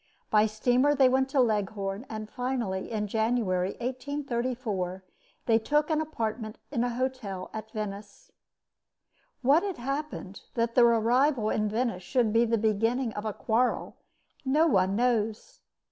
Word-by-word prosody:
By 215 0 +5
steamer 245 +6 +2
they 265 -2 +6
went 265 +1 +2
to 270 - +1
Leghorn; 205 -1 0
and 215 -1 -5
finally, 240 -6 -3
in 215 -2 -2
January, 210 -4 0
1834, 245 -7 -3 0.4
they 225 -1 +4
took 295 +6 +1
an 310 0 +2
apartment 225 -7 -4
in 240 -5 0
a 245 - 0
hotel 250 -7 -3
at 220 0 -6
Venice. 205 -2 -7 1.1
What 285 +6 +5
had 390 -3 -3
happened 275 -6 -4
that 230 0 0
their 240 -1 +6
arrival 235 +1 +3
in 215 -1 0
Venice 225 -3 -1
should 225 +2 +1
be 230 +1 +4
the 230 0 +1
beginning 225 +3 +1
of 210 - -5
a 215 - -2
quarrel, 240 +4 0 0.5
no 290 +4 +3
one 195 - +3
knows. 225 -2 0
230 Hz, 145 wpm, -28 LUFS, 215-255 Hz, 1.1 s, they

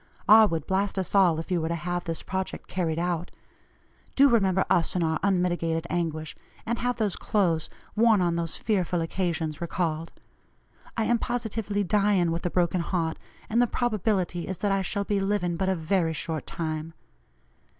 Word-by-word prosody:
R. 215 +1 +8
would 165 -5 -2
blast 195 +1 0
us 190 - -2
all 180 -5 +4
if 165 - -7
you 175 -2 +1
were 160 - -1
to 170 - -1
have 175 +1 -3
this 165 -1 -3
project 190 0 -4
carried 165 -4 -1
out. 175 0 -1 0.9
Do 280 +1 +6
remember 190 -5 +3
us 170 - +1
in 180 - +1
our 160 -1 0
unmitigated 175 -4 0
anguish, 160 -3 -2 0.3
and 235 +1 -1
have 245 0 0
those 215 -5 -1
clothes, 175 -8 0 0.3
worn 220 -1 +5
on 175 -2 +1
those 165 -1 0
fearful 185 -5 0
occasions, 165 -2 -2
recalled. 165 -1 -2 0.9
I 225 - +2
am 235 +1 +2
positively 220 -4 -2
dying 195 -3 +2
with 165 +1 -3
a - - -1
broken 175 0 +1
heart, 170 -2 -2 0.3
and 230 +2 +2
the 245 - +4
probability 205 -7 -1
is 190 - -4
that 205 +2 0
I 195 0 +2
shall 200 +2 -1
be 200 0 0
living 195 -3 0
but 190 +3 0
a 190 - +2
very 165 0 0
short 160 0 -4
time. 160 0 -4
180 Hz, 180 wpm, -26 LUFS, 165-205 Hz, 0.9 s, R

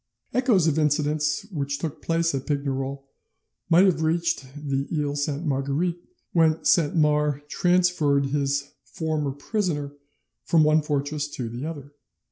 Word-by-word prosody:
Echoes 235 -8 +3
of 160 -1 +2
incidents 150 +2 +1
which 140 -4 -2
took 160 -1 -5
place 165 -1 0
at 135 -1 -4
Pignerol 140 -2 -2 0.7
might 175 +3 +6
have 180 -4 +2
reached 165 -1 0
the 140 -2 -2
Iles 145 -2 -1
Sainte 150 +3 -4
Marguerite 145 +5 -1 0.3
when 160 -2 +3
Saint 165 -3 +3
Mars 150 -2 +2
transferred 175 -5 +2
his 140 0 -1
"former 155 -3 -2
prisoner" 145 -1 -2 0.5
from 160 -2 +4
one 155 +1 +4
fortress 145 0 -2
to 125 -5 -5
the 120 +5 -6
other. 145 -3 -8
150 Hz, 135 wpm, -25 LUFS, 140-165 Hz, 0.7 s, might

